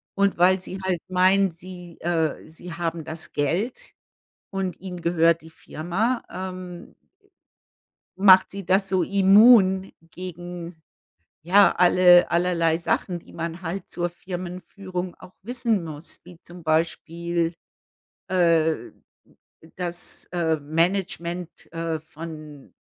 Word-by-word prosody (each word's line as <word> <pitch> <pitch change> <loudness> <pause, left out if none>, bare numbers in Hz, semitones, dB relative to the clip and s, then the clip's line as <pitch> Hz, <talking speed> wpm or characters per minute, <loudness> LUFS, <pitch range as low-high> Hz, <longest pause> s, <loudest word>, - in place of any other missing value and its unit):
Und 200 -2 +2
weil 185 +2 +4
sie 190 +1 -6
halt 185 -3 0
meinen, 185 +1 +3
sie 175 0 -12
äh, 165 -2 -1
sie 165 +2 -10
haben 170 -1 -3
das 160 0 -6
Geld 180 - -2 0.6
und 190 -3 -3
ihnen 180 -2 -7
gehört 165 -1 +3
die 160 - -14
Firma, 195 +11 -2
ähm 185 -1 -7 1.2
macht 190 -1 +7
sie 200 0 -7
das 190 +2 +2
so 185 -2 +2
immun 195 0 +5 0.2
gegen, 175 -2 -8 0.6
ja, 195 +5 +5
alle 180 0 +6
allerlei 170 -2 +2
Sachen, 175 +1 -1
die - - -16
man 170 +2 -5
halt 175 +3 -5
zur 175 0 -2
Firmenführung 180 0 -6
auch 180 - -15
wissen 230 -4 -1
muss, 155 0 -8
wie 175 -1 -15
zum 175 0 -11
Beispiel, 165 +1 -1 0.7
äh, 165 -3 +2 0.8
das, 175 -1 -5
äh, 165 -2 +1
Management, 170 +2 -1 0.2
äh, 165 -1 -2
von 155 -2 -10
175 Hz, 115 wpm, -24 LUFS, 165-185 Hz, 1.2 s, macht